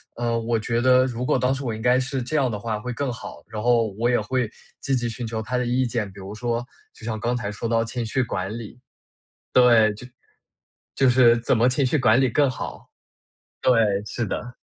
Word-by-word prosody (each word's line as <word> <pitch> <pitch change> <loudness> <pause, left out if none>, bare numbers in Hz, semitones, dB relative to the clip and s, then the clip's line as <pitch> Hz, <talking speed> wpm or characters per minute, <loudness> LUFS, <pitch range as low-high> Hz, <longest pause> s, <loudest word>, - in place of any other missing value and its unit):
呃， 120 -1 -1
我 115 0 0
觉 115 +2 -1
得 130 0 +5
如 125 0 -3
果 - - +2
当 130 +1 +1
时 135 0 -5
我 115 -2 -2
应 110 - -8
该 125 +2 +3
是 130 -1 -2
这 155 +5 -2
样 130 -3 +2
的 105 - -3
话 110 0 -3
会 125 +2 -5
更 135 +1 -2
好， 125 - -9
然 105 -1 -5
后 120 -1 +3
我 120 +1 +2
也 120 - +3
会 125 +1 -1 0.3
积 135 -1 0
极 120 -1 -1
寻 115 0 -5
求 110 -1 -3
她 125 +3 -2
的 125 - 0
意 125 +2 +1
见， 115 -3 -2
比 100 - -11
如 100 +2 -8
说 120 +1 -2 0.3
就 - - -17
像 110 -2 -3
刚 120 +3 -1
才 105 -4 -3
说 110 +2 -4
到 115 0 +2
情 115 +1 -4
绪 130 +3 0
管 100 0 -4
理。 115 +2 -9 0.7
对， 115 -4 +5
就 125 +4 -10 0.9
就 135 -2 +4
是 120 -2 +6
怎 120 0 +1
么 120 +2 +4
情 130 +2 +1
绪 140 +4 +1
管 120 0 +4
理 130 -3 +2
更 145 +2 +3
好。 130 - -7 0.7
对， 130 - +4 0.3
是 115 +2 -3
的。 120 +5 -5
120 Hz, 245 characters per minute, -23 LUFS, 110-125 Hz, 0.9 s, 是